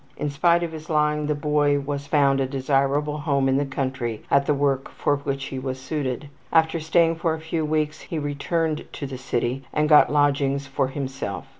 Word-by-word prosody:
In 150 -1 -2
spite 170 +4 +3
of 170 - -3
his 160 0 -9
lying 150 -1 +1
the 150 - +1
boy 145 -1 +2
was 140 0 -4
found 140 -2 +3
a 135 - 0
desirable 140 +2 0
home 140 -2 +1
in 135 0 +2
the 140 0 0
country 130 -4 -3
at 140 0 +3
the 150 - +3
work 140 -1 0
for 145 - 0
which 140 -1 -3
he 130 - -5
was 130 0 -4
suited. 135 -1 -3 0.2
After 160 0 +3
staying 165 +1 +2
for 165 -1 0
a - - -8
few 160 0 -2
weeks 155 0 -1
he 165 - -5
returned 155 +2 -1
to 140 - -5
the 135 -2 -6
city 130 0 -2
and 150 0 +1
got 150 -2 +6
lodgings 140 -1 +2
for 135 0 -1
himself. 130 - -5
145 Hz, 200 wpm, -24 LUFS, 135-150 Hz, 0.2 s, got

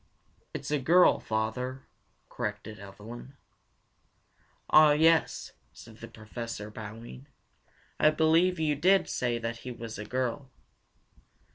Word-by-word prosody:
"It's - - -6
a 150 - +1
girl, 175 +7 +5
father," 125 +4 -3 0.4
corrected 105 +1 -5
Evelyn. 110 +7 -11 1.3
"Ah, 155 -1 +7
yes," 160 +1 +2 0.2
said 110 -1 -14
the 115 - -9
Professor, 110 -1 -7
bowing. 115 +5 -10 0.7
"I 155 - +6
believe 160 +3 +3
you 155 -2 +1
did 190 +7 +3
say 120 -2 -1
that 115 0 -4
he 125 - -9
is 115 -3 -7
a 105 - -5
girl." 130 +3 -3
120 Hz, 115 wpm, -29 LUFS, 110-150 Hz, 1.3 s, Ah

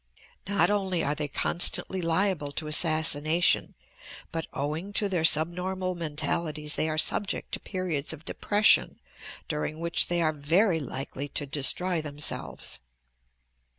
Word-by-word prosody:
Not 200 +1 +3
only 190 -4 0
are 145 - 0
they 150 0 -3
constantly 175 +5 +1
liable 165 -3 0
to 155 - -4
assassination 155 +1 +3 0.6
but, 165 -1 -4
owing 155 +8 -4
to 205 - +1
their 180 -4 -1
subnormal 180 +4 +1
mentalities, 150 -1 -2
they 160 - 0
are 155 - -2
subject 200 +5 +1
to - - -3
periods 180 -7 -3
of 160 0 -9
depression 210 +1 +3 0.5
during 150 0 -3
which 170 0 +2
they 175 -1 +1
are 155 -1 +1
very 165 +5 +2
likely 135 0 -5
to 145 - -3
destroy 160 +5 +1
themselves." 150 -1 -5
160 Hz, 130 wpm, -27 LUFS, 150-185 Hz, 0.6 s, Not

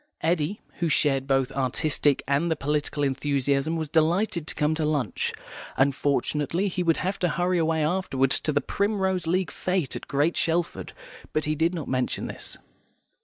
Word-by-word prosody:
Eddy, 165 +4 0 0.2
who 170 - +1
shared 135 -3 +2
both 135 -2 +2
the - - -5
artistic 140 +2 +1
and 140 +5 +1
the 160 - +2
political 145 0 -1
enthusiasm, 140 +2 0
was 160 -1 -2
delighted 170 +3 +1
to - - -2
come 150 0 +1
to 155 0 -1
lunch. 150 -4 0 0.5
Unfortunately 145 +6 +1
he 180 - -2
would 165 -2 +2
have 190 +2 -2
to 180 - +1
hurry 175 +2 +1
away 160 -1 +1
afterwards 150 -6 +1
to 155 - -1
the 145 -1 +1
Primrose 190 0 0
League 180 -2 +1
Fête 180 -7 -1
at - - -7
Great 145 +4 +1
Shelford, 170 +1 -1 0.4
but 155 - 0
he 155 - +1
did 165 +4 +1
not 160 -5 -5
mention 130 -1 -1
this. - - -4
155 Hz, 170 wpm, -26 LUFS, 140-175 Hz, 0.5 s, shared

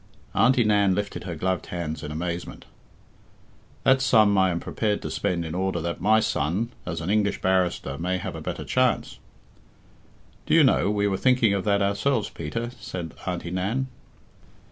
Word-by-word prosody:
Auntie 125 +1 +4
Nan 100 -3 +3
lifted 100 0 -4
her 85 -3 -4
gloved 95 +3 -2
hands 80 -3 -4
in 75 - -6
amazement. 85 +2 -5 1.2
"That 130 0 +4
sum 110 -6 +4
I 95 -1 +4
am 85 -1 -1
prepared 105 +3 -1
to - - -4
spend 85 -2 -1
in 80 - -5
order 95 -1 -1
that 85 +1 -4
my 110 +2 +4
son, 110 - -1 0.2
as 85 -3 -3
an 85 +5 -2
English 105 -1 +1
barrister, 90 -7 0
may 90 +2 -1
have 90 - -5
a - - -6
better - - -5
chance - - 0 0.6
" - - -31
"Do - - +3
you - - +7
know, 100 - +3
we 105 0 +1
were 95 -1 0
thinking 125 -4 +3
of 100 -2 -1
that 100 -1 +2
ourselves, 105 +4 0
Peter?" 115 +10 -4
said 95 -6 -6
Auntie 90 -1 -3
Nan. 110 +9 -1
95 Hz, 175 wpm, -25 LUFS, 85-110 Hz, 1.2 s, you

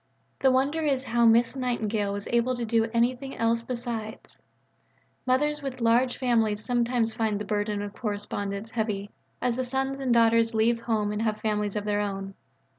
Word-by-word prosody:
The 265 - +4
wonder 275 +5 +1
is 275 -4 +1
how 235 -2 +3
Miss 230 +3 +4
Nightingale 225 -5 -1
was 200 0 -4
able 240 +2 +2
to 240 -1 -3
do 225 0 +1
anything 250 +3 0
else 230 0 +1
besides. 235 -2 -6 0.9
Mothers 295 +4 +1
with 270 -2 -5
large 240 +2 +2
families 225 -5 +1
sometimes 240 -2 +1
find 220 -2 0
the 210 - -4
burden 205 -1 -1
of 205 -1 -6
correspondence 205 -1 -4
heavy 210 -3 -2 0.3
as 245 -1 +1
the 260 - 0
sons 270 +2 -2
and 265 -2 -1
daughters 230 -1 +4
leave 230 +1 +3
home 220 -3 0
and 210 +1 -2
have 215 -1 0
families 210 -2 -1
of 210 -1 -2
their 205 0 +1
own. 195 -1 -4
230 Hz, 175 wpm, -27 LUFS, 210-250 Hz, 0.9 s, The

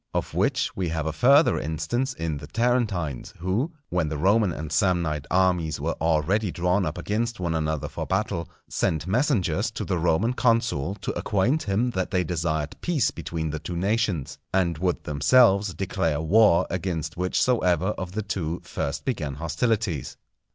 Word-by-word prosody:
Of - - -2
which - - 0
we 90 -3 -1
have 80 -1 -2
a 80 - -2
further 140 - +5
instance 120 - -2
in 80 -2 -3
the 70 - -9
Tarentines, 110 - -1
who, 95 - -1 0.2
when 90 -4 0
the 75 - -3
Roman 100 +4 +3
and 80 -1 -6
Samnite 80 -4 +1
armies 90 -4 +2
were 80 +3 -1
already 85 +6 +1
drawn 90 +3 +1
up 75 - -4
against 115 +2 -2
one 85 -2 -1
another 80 -2 -1
for - - -5
battle, 95 -3 -1 0.2
sent 80 -1 -1
messengers 115 - +1
to - - -5
the 90 -3 -1
Roman 90 +8 +2
consul 115 - +1
to - - -2
acquaint 115 +10 +1
him 110 +5 0
that 95 -4 -2
they 90 -1 +1
desired 80 -4 -2
peace 170 -7 +1
between 80 -2 -4
the 75 - -4
two 85 +2 -5
nations, 100 - -1
and 85 -4 +1
would 90 0 -1
themselves 95 - +4
declare 85 -6 -1
war 90 +1 +4
against 85 -3 -3
whichsoever 90 -1 +1
of 95 -3 -4
the 110 +1 -2
two 90 -5 -3
first 70 0 -4
began 80 - -2
hostilities. 90 - -1
90 Hz, 165 wpm, -25 LUFS, 80-105 Hz, 0.2 s, further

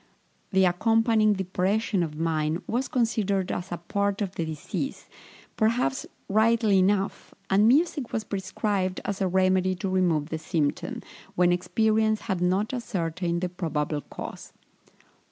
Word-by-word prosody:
The 190 -1 +4
accompanying 220 +3 +3
depression 195 +2 0
of 155 -3 -3
mind 160 +1 -1
was 250 +4 -1
considered 205 -6 0
as 180 +1 -4
a 175 - -2
part 200 +3 -1
of 190 -2 -4
the 170 - -2
disease, 160 - -5 0.5
perhaps 220 - +1 0.2
rightly 220 -1 +3
enough, 195 +2 0 0.2
and 205 +3 +5
music 290 0 +2
was 220 - -1
prescribed 190 -1 -2
as 200 -1 -3
a 190 - +2
remedy 185 0 +2
to 195 +2 -4
remove 170 -5 +1
the 160 - -3
symptom, 155 -2 -2 0.3
when 180 0 +4
experience 215 +4 +1
had 190 -3 -2
not 190 +6 +1
ascertained 175 -7 -2
the 180 - -1
probable 155 -4 -2
cause. - - -9
190 Hz, 135 wpm, -26 LUFS, 175-215 Hz, 0.5 s, and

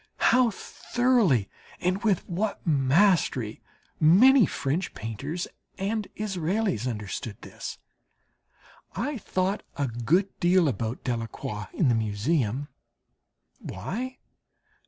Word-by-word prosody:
How 250 -1 +5
thoroughly 220 - +1 0.3
and 185 +4 0
with 205 -6 +1
what 200 +4 -2
mastery 145 - +2 0.4
many 215 - +7
French 155 +7 -2
painters 140 - -4 0.3
and 210 +2 -2
Israels 190 - -1
understood 105 -2 -4
this! - - -7 1.2
I 270 0 -2
thought 190 +1 -1 0.2
a 140 - +1
good 135 - +1
deal 175 -1 +4
about 115 -1 -2
Delacroix 115 -3 -4
in 160 - +1
the - - +4
Museum. 115 +5 0 0.9
Why? 255 +6 -5
170 Hz, 95 wpm, -27 LUFS, -, 1.2 s, many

